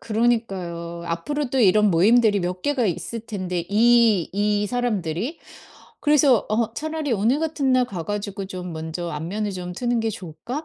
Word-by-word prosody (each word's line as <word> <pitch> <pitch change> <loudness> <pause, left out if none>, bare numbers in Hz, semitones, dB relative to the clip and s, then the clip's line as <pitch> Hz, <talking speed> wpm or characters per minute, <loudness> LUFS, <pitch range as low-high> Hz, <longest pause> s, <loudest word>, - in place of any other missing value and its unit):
그러니까요. 195 -7 -1
앞으로도 265 - -2
이런 210 -2 +5
모임들이 205 +4 +4
몇 180 +1 -3
개가 280 -5 +1
있을 215 +5 -3
텐데 185 -6 -4
이, 225 -3 +4
이 205 +1 +1
사람들이. 225 - -2 0.6
그래서 290 -5 +4
어 220 +1 0
'차라리 310 0 -3
오늘 230 +7 +2
같은 300 -4 0
날 255 -1 +4
가 185 -8 -5
가지고 205 0 -4
좀 180 -2 -6
먼저 160 +2 -5
안면을 185 +8 -3
좀 180 -1 -6
트는 240 +5 -1
게 225 - 0
좋을까?' 195 - -7
210 Hz, 320 characters per minute, -23 LUFS, 180-240 Hz, 0.6 s, 이런